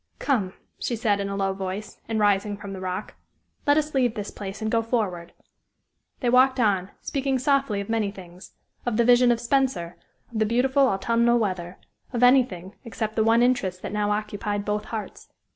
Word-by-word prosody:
"Come," 210 -10 0 0.3
she 240 - -2
said, 210 -3 +1
in 200 0 -2
a 200 - -3
low 195 -1 0
voice, 195 +2 -6
and 220 -1 0
rising 205 0 +2
from 200 -1 -8
the 190 - -6
rock; 185 +2 -4 0.5
"let 290 +1 +5
us 305 0 0
leave 250 -4 +2
this 205 -1 -5
place 200 -1 -7
and 220 0 -2
go 230 - +3
forward." 200 -8 -2 0.9
They 245 - +1
walked 260 +1 +5
on, 200 -5 +2
speaking 270 -1 -1
softly 270 -5 +1
of 200 - -7
many 225 -3 0
things 185 -2 -12 0.3
of 240 -3 -1
the 235 - +3
vision 245 0 +6
of 235 - +1
Spenser, 240 -9 0 0.3
of 225 - -3
the 220 - +3
beautiful 265 +4 +3
autumnal 235 +3 +2
weather, 185 -5 -2 0.4
of 245 0 0
anything 240 -8 +3
except 220 -2 -4
the 220 - +3
one 230 +2 +4
interest 195 -8 0
that - - -5
now 210 0 0
occupied 205 -1 -2
both 210 0 -1
hearts. 220 -2 -7
215 Hz, 190 wpm, -25 LUFS, 195-245 Hz, 0.9 s, vision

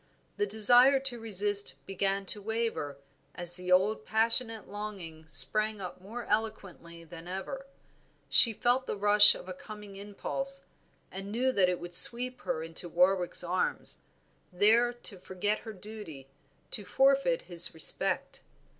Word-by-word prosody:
The 415 - -2
desire 245 +5 +5
to 260 -3 +1
resist 205 -2 -1
began 195 +1 -3
to 205 +1 +3
waver 220 -10 -5 0.4
as 175 0 +2
the 180 0 -6
old 200 +4 +1
passionate 225 0 0
longing 190 -7 -10
sprang 205 +10 +4
up 180 -1 -10
more 230 +5 -9
eloquent 215 -3 -4
than 170 0 -14
ever; 195 +9 -8 0.6
she 230 - +7
felt 245 +4 -1
the - - -5
rush 205 +1 +6
of - - -12
a 185 - -7
coming 205 +1 -13
impulse, 270 +7 -6 0.5
knew 215 +7 -3
that 190 -7 +1
it 180 - -4
would 175 0 -11
sweep 250 +7 +6
her 160 - -5
into 165 +2 -7
Warwick's 180 +1 0
arms, 180 +1 -4 0.5
there 220 +6 +2
to 230 -5 -5
forget 190 +3 -4
her 225 - -11
duty, 195 -9 -12 0.4
to 210 - +1
forfeit 275 - 0
his 175 -1 -3
respect. 160 - -4
205 Hz, 140 wpm, -28 LUFS, 180-225 Hz, 0.6 s, she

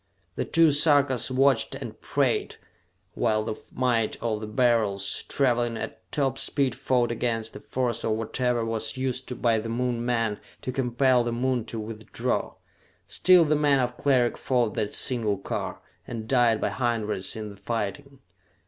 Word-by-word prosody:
The - - -2
two 165 -1 +4
Sarkas 145 -5 +3
watched 130 -3 +2
and - - -8
prayed - - 0 0.6
while 110 -2 +1
the 110 - -3 0.2
might 120 -3 0
of 110 -2 -2
the 110 - -5
Beryls, 105 -4 +1
traveling 120 -4 +1
at 110 - -8
top 135 -2 0
speed, 135 -4 +1
fought 120 -1 +1
against 115 -1 -2
the - - -8
force 125 -3 -2
of 110 - +1
whatever 120 +2 -1
was 115 +1 -3
used 130 -1 -3
by 115 -2 +3
the 115 +1 -5
Moon 120 0 -1
men 115 -4 0 0.2
to 130 - -2
compel 125 0 +2
the 120 - -2
Moon 125 0 0
to 115 -1 -5
withdraw. 110 0 -3 0.5
Still 180 -2 +5
the 150 0 +2
men 145 -2 +3
of 125 -1 -1
Cleric 130 -4 +2
fought 120 -4 +1
that 105 - -2
single 110 -5 -1
car, - - -4 0.3
and 115 -2 -6
died 120 -3 +3
by - - 0
hundreds 110 -6 -2
in 105 -1 -6
the - - -11
fighting. 120 +7 -4
120 Hz, 160 wpm, -26 LUFS, 110-130 Hz, 0.6 s, Still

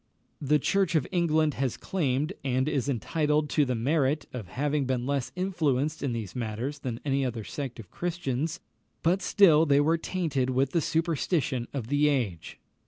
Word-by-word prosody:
The 150 +1 +3
Church 185 +3 +1
of 150 - +2
England 160 -4 +2
has 130 -3 0
claimed, 150 -2 -1
and 130 0 +1
is 145 -3 0
entitled 150 +3 0
to 145 +3 +3
the 125 -1 -1
merit, 140 +4 +1
of 115 -7 -6
having 140 +7 -1
been 125 -1 -1
less 140 -2 -1
influenced 155 -6 0
in 140 - -1
these 115 -5 -5
matters 125 +5 -3
than 120 -4 -4
any 135 -1 +1
other 120 -4 -3
sect 130 +1 -6
of 105 - -11
Christians; 160 -4 -2 0.4
but 180 +4 +2
still 170 -5 +5
they 140 0 +5
were 160 +3 +2
tainted 155 -9 -1
with 130 +1 +1
the 170 - +2
superstition 160 -5 0
of 135 -6 -4
the 145 +4 +2
age. 110 - -2
140 Hz, 170 wpm, -28 LUFS, 125-160 Hz, 0.4 s, still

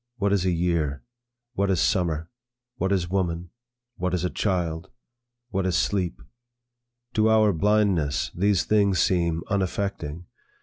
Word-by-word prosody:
What 100 -3 +1
is 95 -2 +1
a - - +3
year? 85 -5 0 0.5
What 100 -3 0
is 95 -3 +2
summer? 85 -5 0 0.5
What 95 - 0
is 90 -3 +1
woman? 85 -3 -1 0.5
What 90 0 -1
is 90 - -2
a 90 - -1
child? 90 -3 -1 0.6
What 95 -1 0
is 90 -1 +1
sleep? 90 -13 -1 0.9
To 110 0 +3
our 110 -2 +4
blindness, 90 -6 +1
these 100 -2 +2
things 100 -3 +2
seem 85 -3 +1
unaffecting. 95 -4 -2
90 Hz, 135 wpm, -25 LUFS, 85-100 Hz, 0.9 s, our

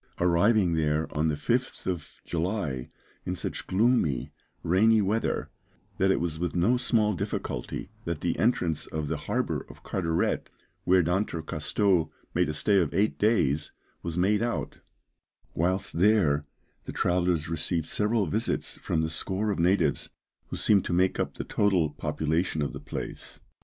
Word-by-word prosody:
Arriving 90 +2 +3
there 80 -1 +1
on 75 +2 +2
the 75 - +1
5th 125 - -1
of 85 -5 -4
July 80 - -2 0.3
in 90 - -3
such - - -5
gloomy, 95 - +2 0.3
rainy 110 +6 +4
weather, 105 +3 0 0.5
that 95 - +3
it 95 - +3
was 80 -2 -2
with 90 0 -2
no 95 +8 +3
small 110 -4 +2
difficulty - - -4
that 85 -3 -3
the - - -1
entrance 90 -9 +1
of 80 -1 -3
the - - -1
harbour - - 0
of - - -14
Carteret, 85 -3 -1 0.4
where 90 0 +5
D'Entrecasteaux 85 0 0 0.2
made 90 -1 +2
a - - -1
stay 100 +5 +3
of 80 -6 +1
eight 105 +3 +1
days, 75 -10 +2 0.3
was 85 0 -4
made 100 +4 +3
out; 120 0 -2 0.7
whilst 90 +1 -1
there 85 -8 +4 0.4
the - - -5
travellers 90 -3 +1
received 85 0 -1
several 105 +4 +1
visits 75 - -2
from 80 - 0
the - - 0
score 100 +5 -1
of 100 - -2
natives, 90 +4 +2 0.4
who - - -5
seem 100 -3 +4
to 85 - -3
make 90 +1 +2
up - - -1
the - - -4
total 90 -7 +2
population 80 +2 -1
of 70 - -3
the - - -6
place. - - -6
90 Hz, 155 wpm, -28 LUFS, 80-100 Hz, 0.7 s, where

